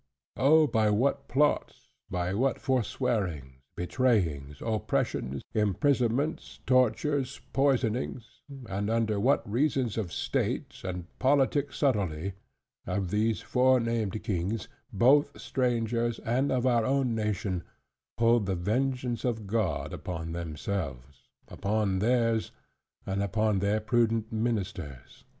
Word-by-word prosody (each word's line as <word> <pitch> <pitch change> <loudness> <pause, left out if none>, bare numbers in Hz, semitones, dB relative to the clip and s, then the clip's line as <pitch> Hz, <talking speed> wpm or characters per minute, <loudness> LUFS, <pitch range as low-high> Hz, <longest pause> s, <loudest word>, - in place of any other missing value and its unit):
Oh, 155 +4 +6
by 110 -5 +2
what 140 +6 +1
plots, 145 +3 0 0.2
by 90 0 -1
what 130 +6 +1
forswearings, 105 - -1
betrayings, 90 - 0
oppressions, 85 - -1
imprisonments, 125 - 0
tortures, 130 +2 +2
poisonings, 125 -3 0 0.3
and 100 +2 -2
under 110 -2 +1
what 100 - +2
reasons 125 -1 0
of 95 -6 -3
state, - - -2
and 90 -2 -4
politic 140 +1 +2
subtlety, 100 - 0 0.5
have 90 -1 -2
these 110 +1 +1
fore 130 0 +3
named 115 -3 -2
kings, 100 +1 -2 0.2
both 140 +8 +3
strangers, 120 -2 0
and 130 +5 +1
of 130 -1 +1
our 120 -3 +3
own 130 0 +1
nation, 105 -4 -1 0.6
pulled 115 -2 +3
the 95 - 0
vengeance 125 +5 -1
of 115 -4 -1
God 100 -7 -1
upon 80 -2 -5
themselves, 75 -5 -5 0.2
upon 100 -2 -1
theirs, 115 0 +2 0.6
and 95 +1 -1
upon 105 0 +1
their 100 +2 +1
prudent 115 0 +1
ministers! 100 - -4
110 Hz, 110 wpm, -29 LUFS, 95-125 Hz, 0.6 s, Oh